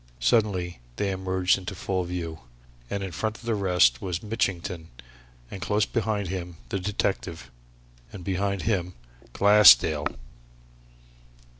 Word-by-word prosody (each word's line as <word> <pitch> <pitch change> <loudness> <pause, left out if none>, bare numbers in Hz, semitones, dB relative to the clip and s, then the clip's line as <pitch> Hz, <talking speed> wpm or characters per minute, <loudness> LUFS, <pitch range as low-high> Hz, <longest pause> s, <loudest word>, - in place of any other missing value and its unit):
Suddenly 90 - +1 0.2
they 100 +6 -1
emerged 95 0 +1
into 95 +1 -6
full 95 0 -2
view, 85 -3 -5 0.5
and 100 -1 -3
in 95 - -5
front 110 +5 -3
of - - -17
the 115 0 -1
rest 90 - +3
was 90 -2 -3
Mitchington 90 -6 -2 0.6
and 95 - -7
close 105 0 +1
behind 105 -5 -2
him 90 -2 -5
the 100 - -2
detective, 90 -8 -3 0.6
and 95 -4 -9
behind 100 +1 -1
him 90 -5 -1 0.4
Glassdale! 80 -8 +6
95 Hz, 125 wpm, -26 LUFS, 85-100 Hz, 0.6 s, Glassdale